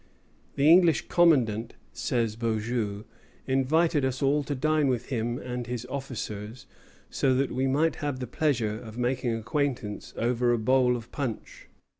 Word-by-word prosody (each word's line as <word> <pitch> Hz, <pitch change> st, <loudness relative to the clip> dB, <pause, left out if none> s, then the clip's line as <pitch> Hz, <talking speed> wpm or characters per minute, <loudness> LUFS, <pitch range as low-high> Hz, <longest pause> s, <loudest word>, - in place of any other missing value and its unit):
"The 140 Hz, +1 st, +3 dB
English 170 Hz, -2 st, +5 dB
commandant," 120 Hz, -10 st, +3 dB
again -, -, -29 dB
says 115 Hz, -3 st, -1 dB
Beaujeu, 110 Hz, -2 st, -2 dB, 0.4 s
"invited 145 Hz, +4 st, +2 dB
us 130 Hz, 0 st, -1 dB
all 145 Hz, +2 st, +2 dB
to 145 Hz, -, -2 dB
dine 155 Hz, +2 st, +2 dB
with 125 Hz, -2 st, -1 dB
him 120 Hz, -2 st, -1 dB
and 125 Hz, -2 st, -5 dB
his 125 Hz, 0 st, -4 dB
officers, 120 Hz, -4 st, -6 dB, 0.5 s
so 130 Hz, -1 st, +2 dB
that 135 Hz, +1 st, 0 dB
we 130 Hz, +2 st, 0 dB
might 150 Hz, +5 st, +1 dB
have 145 Hz, -3 st, -3 dB
the 125 Hz, -, -3 dB
pleasure 115 Hz, -5 st, -1 dB
of 110 Hz, 0 st, -10 dB
making 125 Hz, -1 st, 0 dB
acquaintance 125 Hz, -2 st, -3 dB
over 120 Hz, +1 st, +1 dB
a -, -, +2 dB
bowl 125 Hz, +2 st, +3 dB
of 115 Hz, -1 st, -8 dB
punch." 130 Hz, -7 st, -5 dB
125 Hz, 155 wpm, -27 LUFS, 115-140 Hz, 0.5 s, English